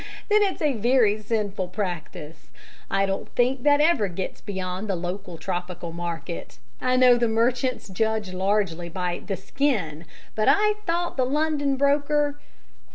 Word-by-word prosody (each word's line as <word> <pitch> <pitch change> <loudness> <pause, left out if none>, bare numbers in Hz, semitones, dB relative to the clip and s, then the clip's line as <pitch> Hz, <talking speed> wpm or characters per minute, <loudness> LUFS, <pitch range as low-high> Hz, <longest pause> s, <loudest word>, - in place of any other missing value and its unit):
Then 425 0 +6
it's 390 -5 0
a 295 -2 +3
very 225 -2 +3
sinful 205 -3 -2
practice. 170 -5 -5 0.4
I 195 0 +2
don't 195 0 -3
think 250 +2 +2
that 290 +2 +4
ever 300 -9 +3
gets 185 +1 -5
beyond 190 0 -4
the 195 - +1
local 180 0 -5
tropical 175 -1 -4
market. 170 0 -5 0.2
I 255 0 +2
know 250 -1 +6
the 235 0 +2
merchants 245 +3 0
judge 215 0 -1
largely 185 -3 0
by 180 0 -3
"the 195 -2 -3
skin," 195 - -1 0.3
but 215 - 0
I 425 +1 +4
thought 345 -1 -1
the 260 - +3
London 285 0 0
broker 290 +1 +2
215 Hz, 150 wpm, -25 LUFS, 180-270 Hz, 0.4 s, Then